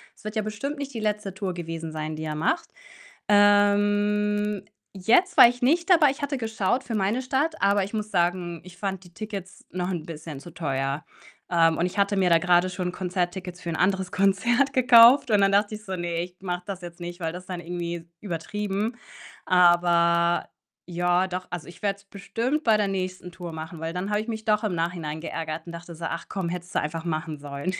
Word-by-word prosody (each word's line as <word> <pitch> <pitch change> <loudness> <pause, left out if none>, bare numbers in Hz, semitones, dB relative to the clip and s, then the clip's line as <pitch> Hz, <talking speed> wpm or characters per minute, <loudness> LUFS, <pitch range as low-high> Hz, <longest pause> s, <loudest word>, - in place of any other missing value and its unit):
Es - - -21
wird 215 +1 -6
ja 215 - +1
bestimmt 215 +8 -4
nicht 280 -1 -5
die - - -2
letzte 210 -2 -2
Tour 190 -2 -3
gewesen 165 -2 -5
sein, 155 0 -4
die 155 - -6
er 155 -1 -3
macht. 320 - 0 0.6
Ähm, 205 0 +3 0.3
jetzt 225 - +2
war - - +11
ich 245 +1 -3
nicht 335 +9 +2
dabei. 310 -5 +7
Ich 280 +2 -4
hatte 280 -1 -1
geschaut 220 +2 0
für 230 -3 -4
meine 210 +5 +1
Stadt, 285 +5 0
aber 200 0 +3
ich 200 - -7
muss 215 -1 -3
sagen, 175 -2 0
ich 180 -1 -13
fand 190 -1 -3
die 175 -1 -17
Tickets 200 -1 -7
noch 180 0 -2
'n 165 -3 -4
bisschen 155 -3 -8
zu 175 - -11
teuer. 140 -1 -2 0.4
Ähm, 165 -2 +3
und 175 - +1
ich 180 - -4
hatte 200 0 +2
mir 185 -2 +3
da 165 - +6
grade 180 0 +3
schon 180 -1 -3
Konzerttickets 180 0 -3
für 170 - -5
'n 160 - -2
anderes 190 +1 +1
Konzert 220 +8 +2
gekauft 250 +1 +7
und 210 - +5
dann 195 - +4
dachte 205 +2 +2
ich 210 0 -11
so: 190 - -3
„Ne, 170 -1 -2
ich 180 0 -10
mache 180 -1 -3
das 195 -2 -6
jetzt 175 0 -10
nicht, 175 +1 -7
weil 165 -1 -2
das 180 +2 -8
ist - - -23
dann 180 -2 -4
irgendwie 170 0 -5
übertrieben.“ 205 +4 -3 0.5
Aber 175 -1 +4 0.4
ja, 175 +1 +1
doch, 185 0 -5
also, 175 -2 -5
ich 175 - -13
werde 200 -1 0
es 200 - -22
bestimmt 230 +9 -2
bei 220 -2 +5
der 210 -1 +1
nächsten 185 -1 -4
Tour 175 -1 -8
machen, 160 +1 -7
weil 165 +1 -4
dann 180 +3 -3
habe 210 0 +1
ich 220 - -5
mich 220 -1 -5
doch 215 0 +2
im 210 - 0
Nachhinein 165 -2 -3
geärgert 160 -1 -5
und - - -6
dachte 170 0 -9
so: 165 +1 -6
„Ach, 165 +1 -4
komm, 190 -3 -3
hättest 180 0 -6
du - - +4
einfach 160 +3 -4
machen 155 -1 -3
sollen.“ 145 +5 -4
185 Hz, 220 wpm, -25 LUFS, 170-210 Hz, 0.6 s, war